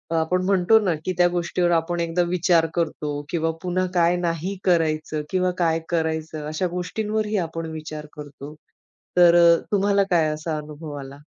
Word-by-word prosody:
आपण 165 +3 +1
म्हणतो 195 +3 +4
ना 190 -6 0
की 185 - -1
त्या 175 0 +5
गोष्टीवर 175 0 0
आपण 170 +1 0
एकदा 170 +1 0
विचार 170 -1 +3
करतो 155 -3 -2 0.2
किंवा 165 -1 0
पुन्हा 185 0 -1
काय 175 0 +3
नाही 175 +2 -2
करायचं 155 -3 +1
किंवा 185 -1 +1
काय 165 -2 +1
करायचं, 160 -2 -2
अशा 155 +4 -1
गोष्टींवरही 210 +4 -2
आपण 165 0 -6
विचार 155 -1 -7
करतो. 145 -1 -9 0.6
तर 175 -1 +7
अ, 170 -1 +6
तुम्हाला 200 0 +3
काय 165 -3 +3
असा 155 0 -4
अनुभव 150 0 -8
आला? 135 0 -9
170 Hz, 160 wpm, -23 LUFS, 160-180 Hz, 0.6 s, तर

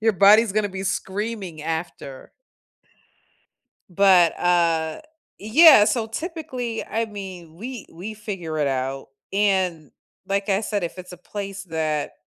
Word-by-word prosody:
Your 225 0 +3
body's 205 +3 +5
gonna 210 0 0
be 190 0 -6
screaming 195 -3 -4
after. 160 -4 -6 1.6
But, 180 -2 +4
uh, 170 - +1 0.4
yeah, 245 +1 +7
so 225 0 0
typically 255 -4 -5
I 225 +1 -2
mean 185 -6 -9
we 240 +3 -7
we 185 +6 -7
figure 190 -7 -6
it 150 -2 +1
out 135 0 -3 0.2
and, 190 -6 0 0.4
like 200 +1 -1
I 195 +1 +2
said, 210 -3 -2
if 170 - -5
it's 185 0 -9
a 180 - -10
place 200 +2 -7
that 155 -3 -2
195 Hz, 130 wpm, -23 LUFS, 165-215 Hz, 1.6 s, yeah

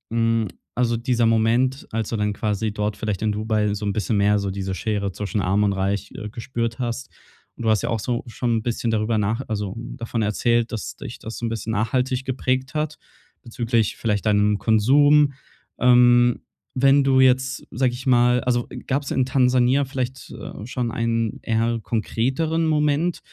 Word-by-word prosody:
hm 115 -2 +2 0.3
also, 120 -1 +1
dieser 120 -1 +1
Moment, 115 +4 +1
als 110 -1 -2
du - - -2
dann 105 0 0
quasi 105 0 -1
dort 105 0 -2
vielleicht 105 -3 -3
in 110 -1 +1
Dubai 105 -1 0
so 105 0 -5
'n 100 - 0
bisschen 105 +1 -1
mehr 100 +1 +3
so 100 -1 -2
diese 95 0 -3
Schere 100 +1 -2
zwischen 105 +2 -3
Arm 95 +3 +1
und 100 -1 +2
Reich, 95 0 -2
äh, 105 - -6
gespürt 115 +1 -4
hast 125 +1 -3 0.5
und - - -8
du 110 - +1
hast 110 -3 +2
ja - - -1
auch 115 -2 0
so 120 +1 -2
schon 115 -1 -1
bisschen 120 0 -2
darüber 110 0 +1
nach 110 +4 0
also, 105 -3 -3
davon 115 -1 -4
erzählt, 115 +2 +1
dass 105 -9 -5
dich - - -9
das 110 - -7
so 120 - -4
'n - - -1
bisschen 115 0 -4
nachhaltig 125 +4 0
geprägt 130 +1 -1
hat 155 0 -2 0.5
bezüglich 115 -2 -1
vielleicht 105 -3 -1
deinem 105 -1 +3
Konsum. 140 +7 +4 0.5
Ähm. 120 -1 +5 0.3
Wenn 135 +2 +4
du 135 -1 +3
jetzt, 130 0 +2
sage 125 0 0
ich 130 +3 -7
mal 125 0 +4
also 120 -1 0 0.2
gab's 140 +1 -1
in 130 - +1
Tansania 130 +1 +3
vielleicht, 130 -1 -5
äh, 105 - -8
schon 125 -1 -2
einen 115 -1 -1
eher 115 +1 0
konkreteren 135 +9 -1
Moment, 155 +2 +1
115 Hz, 180 wpm, -22 LUFS, 105-130 Hz, 0.5 s, Ähm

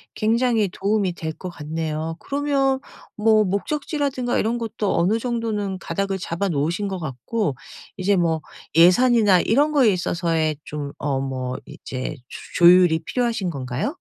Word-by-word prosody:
굉장히 225 -1 +2
도움이 195 0 0
될 160 -2 -4
것 185 - -8
같네요. 160 0 -4
그러면 275 -2 0 0.4
뭐 215 0 +4
목적지라든가 270 - -1
이런 230 +3 0
것도 225 -3 -2
어느 195 +6 +2
정도는 225 -5 -2
가닥을 195 +4 -2
잡아 185 +2 -2
놓으신 170 +7 -1
것 190 -2 -4
같고 150 - -3 0.4
이제 195 0 +1
뭐 165 -2 +1 0.3
예산이나 200 +3 +5
이런 285 - +2
거에 255 -9 +4
있어서의 165 -3 0
좀 145 -1 -5
어 140 -2 -1
뭐 130 -1 -3
이제 130 +3 -6 0.4
조 170 - +4
조율이 175 -2 +7
필요하신 235 -7 -1
건가요? 135 - -3
190 Hz, 310 characters per minute, -22 LUFS, 160-230 Hz, 0.4 s, 조율이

